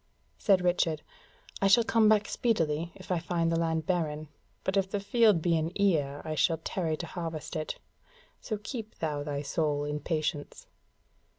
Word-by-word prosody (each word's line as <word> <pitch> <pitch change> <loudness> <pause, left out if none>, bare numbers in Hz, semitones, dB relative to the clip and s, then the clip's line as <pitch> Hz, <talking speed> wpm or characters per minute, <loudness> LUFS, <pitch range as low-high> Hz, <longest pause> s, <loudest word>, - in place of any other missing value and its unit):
Said 195 -3 +4
Richard: 175 -3 +1 0.6
"I 195 - +4
shall 215 +4 +6
come 220 -1 +4
back 210 -1 +4
speedily 170 -8 0
if 185 -1 -9
I 180 - +2
find 170 -1 0
the - - +2
land 160 -1 0
barren; 155 -4 -1 0.3
but 190 - -1
if 195 -1 +2
the 205 - -1
field 205 -4 +3
be 170 -2 +3
in 160 +1 0
ear 145 -8 +1
I 155 - -2
shall 160 +2 +2
tarry 160 -1 -2
to 170 - -5
harvest 165 -2 -5
it. 155 -1 -3 0.6
So 215 - -3
keep 220 +1 -7
thou 150 -3 -2
thy 145 -1 -3
soul 145 0 0
in 150 0 -2
patience." 155 -1 -3
165 Hz, 175 wpm, -29 LUFS, 155-195 Hz, 0.6 s, shall